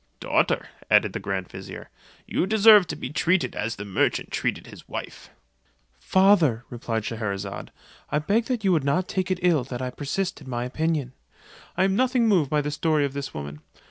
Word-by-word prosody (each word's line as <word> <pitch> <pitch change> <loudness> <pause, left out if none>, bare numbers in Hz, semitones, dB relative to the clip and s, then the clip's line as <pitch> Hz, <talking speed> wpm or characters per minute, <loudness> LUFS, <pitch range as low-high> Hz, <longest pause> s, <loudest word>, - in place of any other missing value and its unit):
"Daughter," - - +1 0.2
added - - +4
the - - -3
grand 95 -2 -3
vizier, - - -9 0.3
"you 185 - -1
deserve 215 -2 +7
to - - -4
be 130 - -6
treated 165 -4 +1
as 115 +1 -2
the 105 - -7
merchant 100 - 0
treated - - -2
his - - -14
wife." - - -7 0.7
"Father," 165 - +3
replied 115 -2 -3
Scheherazade, 100 -4 -4 0.4
"I - - 0
beg 220 - 0
you 195 - +3
would 160 -5 +2
not 175 +7 +1
take 185 -1 -2
it 185 - +1
ill 165 -7 +3
that 125 -2 -6
I 130 -1 -3
persist 155 +7 -3
in 135 - -11
my 120 -1 -2
opinion. 150 -1 -2 0.6
I 185 - +3
am 190 0 +2
nothing 250 0 +2
moved 175 -10 +3
by 150 0 +2
the 150 +1 -3
story 150 0 +1
of 140 - -4
this 140 0 -5
woman. 70 +1 -7
150 Hz, 185 wpm, -25 LUFS, 120-190 Hz, 0.7 s, deserve